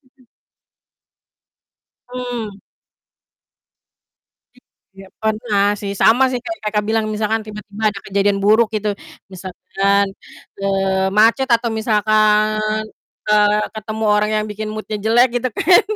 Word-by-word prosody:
Mmm. 255 - -26 1.9
Mmm. 245 -4 -5 2.4
Iya 195 0 -14
pernah 215 -2 0
sih, 200 -1 -4
sama 260 +6 +4
sih 255 - -2
kayak 335 0 -5
Kakak 210 -1 -1
bilang 220 0 0
misalkan 215 +1 -1
tiba-tiba 210 0 -10
ada 200 -1 -5
kejadian 200 0 +1
buruk 215 +2 +4
gitu. 210 0 -1 0.4
Misalkan, 195 +2 -1 0.6
eee, 195 -1 0
macet 230 +5 +4
atau 235 -1 +1
misalkan, 215 -1 +2 0.6
eee, 210 0 +3
ketemu 215 0 -5
orang 210 0 +2
yang 215 - 0
bikin 215 +1 -5
mood-nya 215 0 -5
jelek 230 +4 +4
gitu 255 - -1
kan. 355 +3 +5
215 Hz, 115 wpm, -18 LUFS, 205-220 Hz, 2.4 s, kan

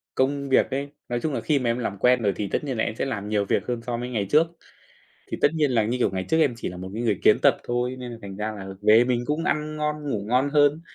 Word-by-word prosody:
công 140 +1 0
việc 130 - +4
ấy, 140 +2 -2 0.2
nói 120 0 -1
chung 155 +1 -2
là - - -2
khi 150 -3 +1
mà 125 -2 0
em 115 - 0
làm 100 -4 -3
quen 125 +4 +3
rồi 100 -3 +1
thì 105 - -3
tất - - -1
nhiên 135 -5 -3
là - - +1
em 110 - -2
sẽ - - -2
làm 105 -6 -4
nhiều 105 -1 +1
việc - - 0
hơn 120 -2 -2
so 120 0 -3
mới 120 +1 -4
ngày 110 -5 -1
trước. 160 +3 +4 0.8
Thì - - -4
tất - - +5
nhiên 150 -3 +2
là, 115 -4 +2
như 120 +4 -1
kiểu, - - +2
ngày 95 -1 -3
trước 160 - +2
em 145 -6 +3
chỉ - - -4
là 90 - -7
một 95 +1 -7
cái 115 - -3
người 110 -5 +1
kiến - - +6
tập - - +5
thôi 120 +1 -1
nên 125 -1 -7
là 115 - -9
thành 95 -1 -8
ra 105 +1 -3
là 100 -2 -8
về 110 +3 +6
mình 120 -1 0
cũng 150 +3 -1
ăn 155 0 -1
ngon, 150 -1 -2
ngủ 105 -4 -2
ngon 130 +4 +2
hơn. 145 +1 +3
125 Hz, 305 wpm, -24 LUFS, 110-140 Hz, 0.8 s, kiến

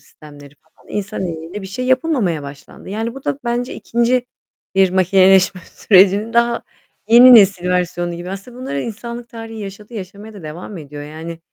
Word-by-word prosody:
sistemleri 145 -2 -15
falan. - - -28
İnsan 205 -2 -4
eliyle 170 +4 -7
bir - - -7
şey 250 +7 -5
yapılmamaya 255 - +1
başlandı. 140 +4 -11
Yani, 225 +4 -3
bu 270 - -11
da 270 - -2
bence: 240 +1 -2
2. 240 +1 0 0.5
bir 190 -1 +4
makineleşme 185 0 +4
sürecinin 200 +5 +3
daha 235 0 +2 0.5
yeni 245 +2 +9
nesil 190 -4 +5
versiyonu 175 -1 -1
gibi. 175 +2 -7
Aslında 200 +6 -9
bunları 195 - -4
insanlık 235 +2 -7
tarihî 225 -2 -9
yaşadı, 205 +3 -9
yaşamaya 205 +2 -8
da 195 - -11
devam 170 +5 -8
ediyor. 145 -1 -9
Yani 160 +2 -8
195 Hz, 160 wpm, -18 LUFS, 175-235 Hz, 0.5 s, yeni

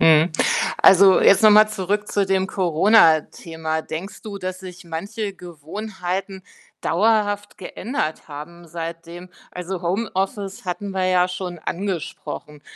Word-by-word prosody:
Mhm, 160 +1 +5 0.5
also, 190 0 +7
jetzt 195 +1 +5
nochmal 215 0 +7
zurück 205 0 -2
zu 200 - +1
dem 190 0 +1
Coronathema. 165 -4 +2
Denkst 175 +7 -7
du, 205 -2 -7
dass 185 -1 -5
sich 185 -1 -10
manche 195 +5 -5
Gewohnheiten 190 +2 -6 0.4
dauerhaft 205 +2 0
geändert 180 - -4
haben 170 +4 -10
seitdem? 170 +2 -7 0.2
Also, 180 0 -6
Homeoffice 195 +1 -3
hatten 190 +2 -4
wir 190 -1 -1
ja 180 -1 +3
schon 180 -1 -6
angesprochen, 165 -4 -5
185 Hz, 120 wpm, -21 LUFS, 170-200 Hz, 0.5 s, also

